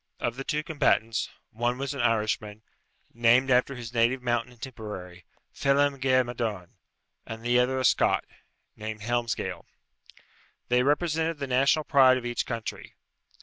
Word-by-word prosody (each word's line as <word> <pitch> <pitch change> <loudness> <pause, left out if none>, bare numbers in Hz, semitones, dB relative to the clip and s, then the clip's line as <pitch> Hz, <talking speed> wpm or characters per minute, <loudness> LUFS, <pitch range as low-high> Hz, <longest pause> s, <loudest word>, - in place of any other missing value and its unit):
Of 120 - -2
the 135 - -5
two 150 +2 -2
combatants, 115 -8 +1 0.2
one 120 +2 -1
was 140 +1 -3
an 140 - -3
Irishman, 110 -2 -1 0.5
named 120 +3 +4
after 125 +2 +3
his 120 -1 -8
native 120 +2 +2
mountain 120 0 -1
in 120 - -18
Tipperary, 105 -8 -8 0.3
Phelem 140 0 +2
ghe 130 -1 +3
Madone, 110 -7 -4 0.6
and 115 0 -7
the 120 +1 +3
other 130 +1 +1
a 130 - 0
Scot, - - +3 0.5
named 110 0 -6
Helmsgail. 120 +1 -2 1.1
They 125 0 +4
represented 160 +3 +1
the 140 - -3
national 135 +4 +2
pride 130 -2 +5
of 125 - -6
each 120 0 -2
country. 115 -3 -6
120 Hz, 145 wpm, -27 LUFS, 115-135 Hz, 1.1 s, pride